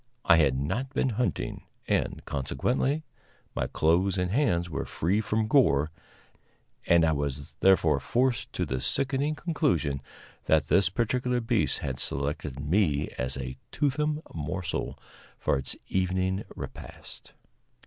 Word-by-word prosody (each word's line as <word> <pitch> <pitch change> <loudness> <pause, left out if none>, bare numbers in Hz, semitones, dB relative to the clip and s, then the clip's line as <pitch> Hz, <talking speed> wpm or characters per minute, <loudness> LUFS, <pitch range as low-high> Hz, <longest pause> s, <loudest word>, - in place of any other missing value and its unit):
I 85 - +7
had 70 -5 +3
not 95 - -2
been 130 - +2
hunting, 115 - -2 0.2
and, - - 0
consequently, 125 - 0 0.5
my - - -1
clothes 90 +5 +2
and 90 0 0
hands 100 -9 +2
were 80 - -3
free 95 +7 0
from 110 +1 0
gore, 90 - +4 1.0
and 85 -1 +5
I 80 - +3
was 70 -2 -3
therefore 95 0 +4
forced 125 0 0
to - - -1
the 65 0 -2
sickening 135 +3 0
conclusion 130 - 0 0.4
that 75 -2 +3
this 95 -1 +4
particular 125 +4 0
beast 115 - +1
had 65 -3 -3
selected 70 -1 -2
me 75 -1 +1
as 65 +1 -2
a 65 -1 -5
toothsome 150 +2 0
morsel 85 +3 -3 0.4
for - - +1
its 65 -1 -3
evening 95 +1 0
repast. - - -9
90 Hz, 130 wpm, -28 LUFS, -, 1.0 s, I